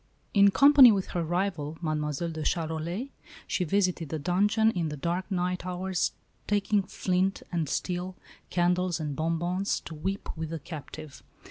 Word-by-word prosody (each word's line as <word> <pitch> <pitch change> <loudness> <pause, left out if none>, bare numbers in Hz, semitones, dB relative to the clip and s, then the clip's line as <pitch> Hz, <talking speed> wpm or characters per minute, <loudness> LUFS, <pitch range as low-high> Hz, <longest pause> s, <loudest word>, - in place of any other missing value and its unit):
In 200 -1 +7
company 275 +2 +8
with 195 -3 -1
her 175 - -1
rival, 165 -3 -2
Mademoiselle 155 0 -2
de 160 -1 -5
Charolais, 165 - -2 0.4
she 185 - -1
visited 180 -3 0
the 160 - -2
dungeon 205 +7 +2
in 170 -6 -2
the 150 - -5
dark 175 +7 -2
night 180 -1 -1
hours, 185 0 -1 0.3
taking 205 0 +2
flint 190 0 -1
and 165 -5 -1
steel, 180 +2 -2 0.3
candles 180 0 +1
and 150 -3 -3
bonbons, 170 +5 -1
to 165 - -9
weep 190 +6 -4
with 160 -1 -4
the 165 - -4
captive. 155 -1 -9
180 Hz, 150 wpm, -28 LUFS, 160-190 Hz, 0.4 s, company